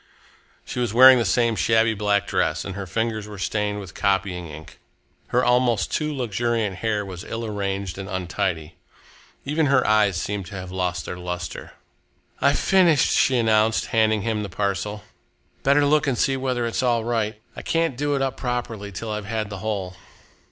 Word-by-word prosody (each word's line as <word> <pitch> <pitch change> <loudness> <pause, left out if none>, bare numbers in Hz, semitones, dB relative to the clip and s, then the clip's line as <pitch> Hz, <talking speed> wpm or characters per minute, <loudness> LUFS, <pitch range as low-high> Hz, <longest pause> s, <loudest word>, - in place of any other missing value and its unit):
She - - -5
was 120 -3 -1
wearing 130 0 +9
the 115 - 0
same 115 +4 +2
shabby 110 +5 +3
black 100 -1 +1
dress 85 -6 -1
and 95 - -5
her 100 0 -6
fingers 110 +2 -2
were 105 -1 -9
stained 105 +1 -2
with 95 -5 -9
copying 95 -3 -1
ink. 80 0 -11 0.5
Her 125 +1 +1
almost 120 -5 +2
too 155 -1 -1
luxuriant 115 -5 -1
hair 105 -1 -1
was 90 -2 -8
ill 115 0 -5
arranged 100 -3 -3
and 95 0 -6
untidy. 90 -3 -3 0.7
Even 150 +2 +1
her 135 -2 +3
eyes 105 -4 +3
seemed 100 0 -4
to 100 - -9
have 90 -1 -7
lost 90 -1 -2
their 90 - -6
lustre. 90 0 -6 0.7
"I've 140 +1 +3
finished," 175 -7 +3
she 130 - +3
announced, 110 -1 +2
handing 110 -2 +3
him 110 -1 -1
the 105 - -5
parcel. 100 +2 -2 0.6
"Better 145 +1 +4
look 150 0 +3
and 130 -3 0
see 135 - +2
whether 130 -2 -1
it's 115 - -1
all 120 -3 +1
right. 110 -2 -1 0.2
I - - -7
can't 165 -5 0
do 145 +2 0
it 135 - 0
up 135 -1 -2
properly 120 -5 -4
till 110 +4 -5
I've 105 -1 -4
had 110 0 -3
the 100 - -6
whole." 95 -4 -4
110 Hz, 180 wpm, -23 LUFS, 95-120 Hz, 0.7 s, wearing